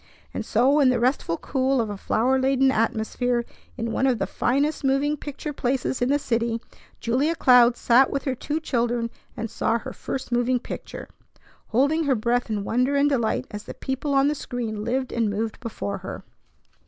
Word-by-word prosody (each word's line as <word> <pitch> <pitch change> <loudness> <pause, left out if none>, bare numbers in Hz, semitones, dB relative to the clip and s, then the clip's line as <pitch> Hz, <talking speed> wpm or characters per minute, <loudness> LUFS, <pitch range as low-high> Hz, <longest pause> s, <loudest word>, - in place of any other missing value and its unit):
And - - -3
so 275 +4 +3
in 275 -3 +5
the 255 - +2
restful 245 -9 +1
cool 265 -1 0
of 220 -3 -1
a - - -4
flower 250 +6 +1
laden 265 0 +3
atmosphere 235 +1 0 0.3
in 230 -1 -2
one 265 - +1
of 255 -3 +2
the - - -1
finest 285 +5 0
moving 275 +2 +2
picture 295 +1 -6
places 260 -1 -1
in 245 - +2
the 285 - +4
city 230 -4 -1 0.4
Julia 270 +8 +1
Cloud 245 -4 +6
sat 255 +3 +4
with 275 - -2
her 265 - -1
two 295 +5 -3
children 240 -5 -1 0.3
and 225 0 -3
saw 225 +1 0
her 260 +3 -7
first 265 -2 -5
moving 245 +1 +2
picture, - - -7 0.6
holding 285 +7 +2
her 275 -2 +3
breath 240 +2 0
in 210 -2 -1
wonder 250 +7 +1
and 285 +1 +4
delight 235 -6 0
as 210 0 -7
the - - -8
people 270 +2 -2
on 275 +1 +4
the 295 - +2
screen 235 -7 -4
lived 255 +3 -1
and 230 -2 +1
moved 220 +2 -3
before 210 - -4
her. - - -7
250 Hz, 190 wpm, -24 LUFS, 230-270 Hz, 0.6 s, Cloud